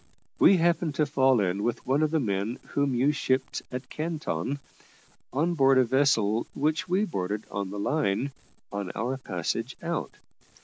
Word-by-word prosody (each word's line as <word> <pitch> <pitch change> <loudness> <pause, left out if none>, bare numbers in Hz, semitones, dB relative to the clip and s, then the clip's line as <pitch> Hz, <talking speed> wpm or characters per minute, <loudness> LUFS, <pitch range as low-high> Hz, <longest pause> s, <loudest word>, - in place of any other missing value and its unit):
We 195 - +7
happened 170 -2 +1
to 150 - +2
fall 135 -3 +3
in 95 0 0
with 120 +2 -2
one 135 +4 +2
of 155 - +3
the 160 +1 +1
men 105 -1 -1
whom 140 -2 0
you 135 +4 +3
shipped 130 -2 -1
at 125 +1 -6
Canton, 150 - -2 0.7
on 160 +6 +1
board 135 -4 +4
a 130 - +6
vessel 120 -4 +2
which 155 +5 0
we 190 +4 +2
boarded 105 - -3
on 100 -1 -3
the 100 - -6
line, 135 +1 0 0.4
on 100 -2 -3
our 125 +5 -1
passage 115 +2 -3
out. 170 -1 -3
130 Hz, 165 wpm, -27 LUFS, 105-150 Hz, 0.7 s, We